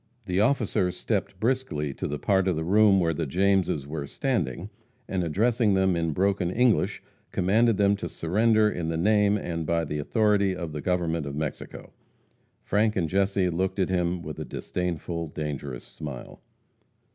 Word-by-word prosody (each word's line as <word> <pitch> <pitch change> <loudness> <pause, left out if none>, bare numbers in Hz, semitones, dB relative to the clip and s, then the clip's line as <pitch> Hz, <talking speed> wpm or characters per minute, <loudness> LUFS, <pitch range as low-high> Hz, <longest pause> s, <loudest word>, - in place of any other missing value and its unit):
The 90 -1 0
officer 110 -5 +2
stepped - - -3
briskly 110 - -1
to - - -4
the 75 - -3
part 95 +5 +1
of 90 - +2
the 80 - -2
room 100 +2 +5
where 85 -2 +1
the 80 -1 -3
Jameses 95 -3 +1
were 75 -1 -5
standing, 95 - -2 0.4
and 95 -2 -1
addressing 110 +5 +2
them 95 -1 +2
in 85 -1 0
broken 95 +1 +1
English, 120 +4 +1 0.3
commanded 110 +4 +2
them 100 0 +3
to 85 -3 -5
surrender 110 +7 +2
in 85 -6 -2
the 80 - -1
name 105 +3 +3
and 85 -4 -3
by 85 +1 0
the 75 0 -3
authority 100 +2 +2
of 85 -3 -5
the 75 -1 -5
government 85 -4 -1
of 70 - -5
Mexico. 75 -1 -6 0.7
Frank 105 +2 +1
and 85 -4 0
Jesse 95 -1 +1
looked 95 +4 -1
at 95 -2 +1
him 90 -1 0
with - - -7
a - - -3
disdainful, 85 -2 -4
dangerous 70 -4 -5
smile. 70 -5 -9
90 Hz, 170 wpm, -26 LUFS, 80-105 Hz, 0.7 s, room